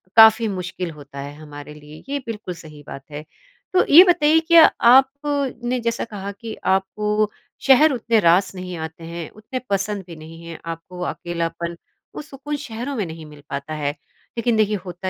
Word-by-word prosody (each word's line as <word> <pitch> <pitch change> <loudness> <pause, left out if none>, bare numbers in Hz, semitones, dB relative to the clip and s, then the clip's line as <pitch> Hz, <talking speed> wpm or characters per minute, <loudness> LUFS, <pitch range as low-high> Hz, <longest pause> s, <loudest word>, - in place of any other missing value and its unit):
काफ़ी 225 +1 +8
मुश्किल 180 -3 -4
होता 145 -2 -11
है 140 +1 -6
हमारे 150 -1 -10
लिए, 150 +1 -13
ये 285 - -1
बिल्कुल 210 -6 -5
सही 150 -3 -13
बात 135 - -8
है। 145 +1 -6 0.5
तो 370 - +4
ये 350 +4 +12
बताइए 310 -1 +4
क्या 330 0 +7 0.3
आपने 270 -2 +2
जैसा 235 0 -2
कहा 200 -2 -6
कि 220 +2 -8
आपको 195 +2 0
वो 215 -1 +2 0.4
शहर 295 +3 +7
उतने 230 -2 +1
रास 180 +1 +3
नहीं 180 -1 -6
आते 160 +1 -7
हैं, 170 -1 -6
उतने 215 +5 -7
पसंद 200 0 -1
भी 170 - -9
नहीं 160 +1 -12
हैं 165 -1 -8
आपको 165 +2 -7
अकेलापन, 170 0 -4 0.4
वो - - -5
सुकून 295 0 -6
शहरों 270 -1 -5
में 210 -6 -1
नहीं 160 -1 -9
मिल 150 -1 -14
पाता 140 +3 -5
है। 145 -2 -1 0.5
लेकिन 230 -1 +1
देखिए, 215 -1 +2
होता 180 +1 -5
195 Hz, 180 wpm, -21 LUFS, 165-240 Hz, 0.5 s, ये